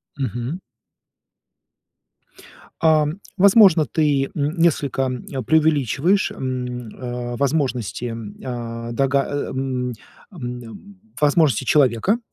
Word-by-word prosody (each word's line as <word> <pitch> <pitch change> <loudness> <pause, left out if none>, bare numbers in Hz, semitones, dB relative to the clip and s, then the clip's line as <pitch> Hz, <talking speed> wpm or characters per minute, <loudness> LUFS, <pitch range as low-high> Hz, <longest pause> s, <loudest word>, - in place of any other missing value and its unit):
Мгм. 130 - -3 2.2
Ам, 155 +1 +3 0.2
возможно, 195 -5 +6
ты, 145 -4 +1
м, 150 +3 -1
несколько, 145 -5 +2
м, 125 -1 -3 0.2
преувеличиваешь, 160 - +2
м, 125 -2 -4
э, 120 -1 -5
возможности, 130 -5 -1
м, 115 -3 -6
а, 115 -2 -5
дога 135 +2 +2
э, - - -7 0.2
м, 130 -1 -2
м, 125 - -5 0.4
ам, 125 - -6
м, 190 - -13 0.2
возможности 150 -4 +3
человека. 140 - +2
135 Hz, 100 wpm, -21 LUFS, 125-155 Hz, 2.2 s, возможно